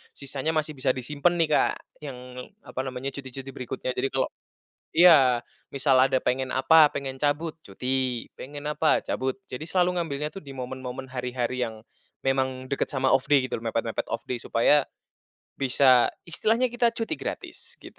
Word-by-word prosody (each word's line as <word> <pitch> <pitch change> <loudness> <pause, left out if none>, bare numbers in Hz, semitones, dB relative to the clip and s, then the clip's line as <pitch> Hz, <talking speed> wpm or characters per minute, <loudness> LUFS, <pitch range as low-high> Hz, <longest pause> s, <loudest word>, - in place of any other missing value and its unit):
sisanya 140 +2 -3
masih 155 0 0
bisa 130 -1 +1
disimpen 145 +7 0
nih, 165 - +4
Kak, - - +3 0.3
yang 135 -4 -6 0.5
apa - - -7
namanya 130 +1 -4
cuti-cuti 135 0 -7
berikutnya. 130 0 -4
Jadi 135 +2 0
kalau 135 - +1 0.7
iya, 145 -8 +7 0.3
misal 135 -1 +3
ada 130 0 +4
pengen 130 +1 0
apa 150 +4 +6
pengen 135 -1 -4
cabut, 150 +2 0
cuti. 125 +3 -2
Pengen 145 +2 -8
apa, 155 +1 +3
cabut. 130 0 -2
Jadi 125 +5 -5
selalu 180 +1 +1
ngambilnya 150 -3 -2
tuh 195 - -9
di 140 - -9
momen-momen 130 +1 -6
hari-hari 125 0 -2
yang 110 -2 -7 0.4
memang 130 -1 0
deket 140 - -1
sama 130 -1 +1
off 135 - +2
day 140 -3 +5
gitu 125 - -3
loh 115 - -12
mepet-mepet 115 0 -2
off - - -4
day 125 - -2
supaya 145 +5 +4 0.7
bisa 130 -2 +4 0.2
istilahnya 225 +8 +1
kita 240 -1 +2
cuti 230 +7 -2
gratis - - -7
gitu. - - -13
135 Hz, 165 wpm, -26 LUFS, 130-150 Hz, 0.7 s, iya